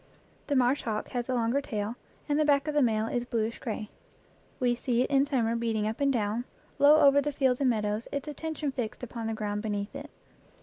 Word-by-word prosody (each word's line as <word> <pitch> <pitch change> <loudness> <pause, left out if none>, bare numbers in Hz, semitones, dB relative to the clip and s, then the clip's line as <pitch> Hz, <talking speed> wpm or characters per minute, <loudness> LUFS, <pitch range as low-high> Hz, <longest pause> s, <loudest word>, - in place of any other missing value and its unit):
The 285 - 0
marsh 255 +2 +3
hawk 215 -2 -3
has 245 -2 -3
the 260 - 0
longer 240 +4 +1
tail, 215 -4 -3 0.3
and 295 0 +1
the - - +4
back 285 -1 +3
of 300 - -1
the 295 - +3
male 220 -3 +2
is 240 +1 -1
bluish 230 -1 -2
gray. 220 -3 -5 0.7
We 245 -1 +2
see 245 0 0
it - - -4
in 275 0 +4
summer 235 -5 +1
beating 225 -2 -1
up 220 +5 -3
and 280 0 +3
down, 225 0 -1 0.3
low 295 +2 +7
over 280 0 +6
the 295 +1 -1
fields 265 -2 +1
and 265 - +4
meadows, 215 -1 -1
its 280 +1 -3
attention 305 -1 -3
fixed 245 -2 -5
upon 230 -2 -5
the 225 - -2
ground 210 -1 -2
beneath 205 +2 -3
it. 285 +2 -7
245 Hz, 220 wpm, -29 LUFS, 220-280 Hz, 0.7 s, low